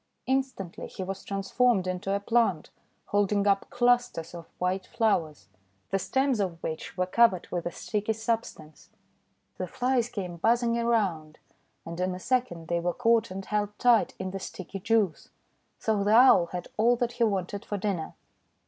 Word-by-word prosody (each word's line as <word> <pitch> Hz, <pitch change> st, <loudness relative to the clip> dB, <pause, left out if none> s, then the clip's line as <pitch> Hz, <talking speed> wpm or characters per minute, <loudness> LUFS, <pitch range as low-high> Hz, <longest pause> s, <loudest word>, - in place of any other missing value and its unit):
Instantly 260 Hz, -9 st, -2 dB
he 190 Hz, -, -6 dB
was 195 Hz, +1 st, -5 dB
transformed 195 Hz, +1 st, +1 dB
into 185 Hz, +2 st, -3 dB
a 200 Hz, -, +1 dB
plant 200 Hz, -6 st, +1 dB, 0.4 s
holding 205 Hz, 0 st, +2 dB
up 195 Hz, -1 st, +2 dB
clusters 245 Hz, -9 st, +1 dB
of 170 Hz, -1 st, -9 dB
white 185 Hz, +1 st, -1 dB
flowers, 160 Hz, -, 0 dB, 0.4 s
the 195 Hz, -, +1 dB
stems 265 Hz, +3 st, +1 dB
of 185 Hz, -4 st, -1 dB
which 160 Hz, +3 st, -5 dB
were 180 Hz, -, +1 dB
covered 190 Hz, -1 st, +3 dB
with 175 Hz, -1 st, -2 dB
a -, -, -3 dB
sticky 210 Hz, +4 st, -2 dB
substance. 220 Hz, -9 st, -4 dB, 0.7 s
The 185 Hz, -, -2 dB
Flies 245 Hz, +4 st, 0 dB
came 185 Hz, -7 st, -5 dB
buzzing 235 Hz, +5 st, +2 dB
around, 200 Hz, -10 st, 0 dB, 0.5 s
and 170 Hz, +1 st, -7 dB
in 185 Hz, 0 st, 0 dB
a -, -, -7 dB
second 215 Hz, -9 st, -1 dB
they 170 Hz, 0 st, 0 dB
were 175 Hz, +1 st, -1 dB
caught 230 Hz, -2 st, +3 dB
and 190 Hz, +1 st, -6 dB
held 210 Hz, 0 st, -2 dB
tight 240 Hz, -3 st, +3 dB
in 185 Hz, 0 st, -4 dB
the 195 Hz, -, -5 dB
sticky 190 Hz, +1 st, -7 dB
juice. 205 Hz, -4 st, 0 dB, 0.5 s
So 215 Hz, -3 st, 0 dB
the 210 Hz, +2 st, +4 dB
Owl 240 Hz, -8 st, +7 dB
had 180 Hz, 0 st, -6 dB
all 235 Hz, +3 st, +4 dB
that 240 Hz, 0 st, -1 dB
he 240 Hz, -, -1 dB
wanted 200 Hz, -2 st, -1 dB
for 205 Hz, -, -4 dB
dinner. 190 Hz, -5 st, -3 dB
200 Hz, 165 wpm, -28 LUFS, 180-230 Hz, 0.7 s, Owl